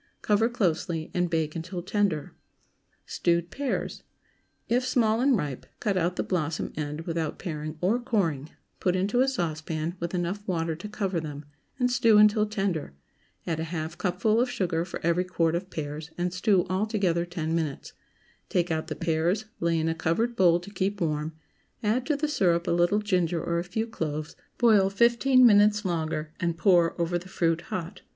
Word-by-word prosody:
Cover 215 +2 +3
closely, 170 -7 -1
and 180 -1 +1
bake 160 -2 -1
until 175 +2 -5
tender. 190 -6 0 0.7
STEWED 170 0 0
PEARS. 280 -1 -2
✠ - - -21 0.6
If 245 +2 +2
small 230 -3 +2
and 265 -2 +4
ripe, 145 -7 -4
cut 205 -2 0
out 180 0 +1
the - - -1
blossom 165 -4 -2
end, 150 0 -4
without 165 -2 -3
paring 155 -3 -5
or 205 +7 +2
coring; 170 - -1 0.3
put 180 -1 +1
into 200 +7 +1
a 265 - +3
saucepan, 160 - -2
with 170 +2 -3
enough 180 +3 -2
water 165 -3 -1
to 180 +6 -8
cover 195 -4 -1
them, 150 -2 -7 0.3
and 250 -1 +1
stew 230 -3 +5
until 210 0 +5
tender; 195 - -2 0.5
add 165 -2 -2
a 160 - -2
half 160 -1 -4
cupful 195 +5 +1
of 250 - +1
sugar 170 -7 -1
for 175 - -6
every 170 +2 +2
quart 165 -3 0
of 180 +2 -3
pears, 150 -1 -5
and 175 0 -1
stew 185 0 +2
all 190 +4 0
together 185 -6 +1
ten 170 -2 -3
minutes; 160 -4 -3 0.6
take 175 -1 +1
out 160 0 -1
the - - -4
pears, 170 +5 0
lay 170 0 +1
in 160 0 0
a 165 - +1
covered 170 +9 0
bowl 175 -3 +4
to 200 +3 -11
keep 195 +1 -1
warm; 155 -2 -1 0.5
add 235 +5 +1
to 300 - +2
the 300 +2 -1
syrup 175 - +2
a - - +1
little 175 +5 +3
ginger 180 -4 +1
or 170 +1 -1
a - - -2
few 200 +6 -2
cloves, 155 -8 -4 0.2
boil 215 -5 +5
fifteen 235 +5 +4
minutes 210 -1 +5
longer, 160 -3 -2
and 170 -1 -1
pour 175 -1 +3
over 175 +1 0
the 185 +2 -13
fruit 165 -2 +1
hot. 185 +2 -5
175 Hz, 185 wpm, -27 LUFS, 165-210 Hz, 0.7 s, stew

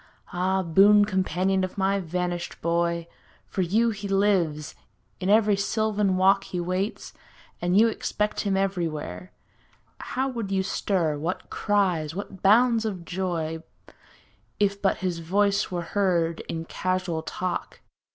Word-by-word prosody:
Ah, 190 +2 +1
boon 200 +5 +6
companion 190 0 0
of 185 +2 -4
my 195 +1 +1
vanished 175 0 -3
boy. 170 0 0 0.4
For 190 - -3
you 220 +6 +2
he 205 -1 -6
lives; 190 -7 +1 0.5
in 185 - -2
every 210 -1 +5
sylvan 210 -1 0
walk 195 +1 +4
He 180 - -4
waits; 185 +4 -3 0.5
and 175 +2 +2
you 230 - +6
expect 210 -1 -2
him 195 -2 0
everywhere. 165 - -3 0.7
How 260 +1 -2
would 235 -6 -4
you 190 -1 +1
stir, 170 -6 -1
what 170 +5 -4
cries, 180 -7 0
what 195 -1 -7
bounds 230 +3 +4
of 190 -6 -4
joy. 165 -3 -3 1.0
If 200 -1 +1
but 195 - +2
his 175 -2 -1
voice 200 +4 +1
were 175 -2 -3
heard 170 -3 0
in 165 -1 -4
casual 185 -2 -2
talk. 180 +2 -4
190 Hz, 135 wpm, -25 LUFS, 170-200 Hz, 1.0 s, boon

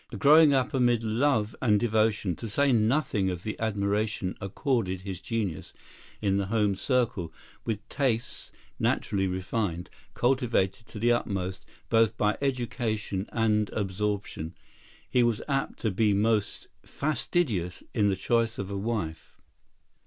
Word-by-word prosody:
Growing 150 +7 +7
up 135 -2 +1
amid 120 -3 +3
love 110 -1 +1
and 105 -5 +4
devotion, 110 -5 +1
to 115 - -6
say 140 +6 +2
nothing 115 -3 +2
of 90 -1 -4
the 110 - -3
admiration 105 -2 -1
accorded 100 - -1
his 95 -1 -6
genius 110 -8 -3 0.5
in 100 -1 +2
the 100 -1 -1
home 105 -1 +2
circle, 100 - 0 0.3
with 110 -2 -3
tastes, 130 -4 -1 0.3
naturally 95 -2 +1
refined, 90 -1 -2 0.2
cultivated 120 -4 +1
to - - -10
the 120 +3 +3
utmost 95 -6 -2 0.2
both 115 -1 +3
by 105 0 +2
education 115 -7 -2
and 105 -2 +1
absorption, 100 -4 -3 0.5
he 125 - +2
was 120 -3 +2
apt 135 -1 -1
to 110 - 0
be 105 +1 +2
most 105 0 +1
fastidious 130 - -1
in 105 -3 +3
the 95 - +1
choice 115 +3 +1
of 100 0 -4
a 100 - -2
wife. 100 -7 -4
110 Hz, 135 wpm, -28 LUFS, 100-120 Hz, 0.5 s, Growing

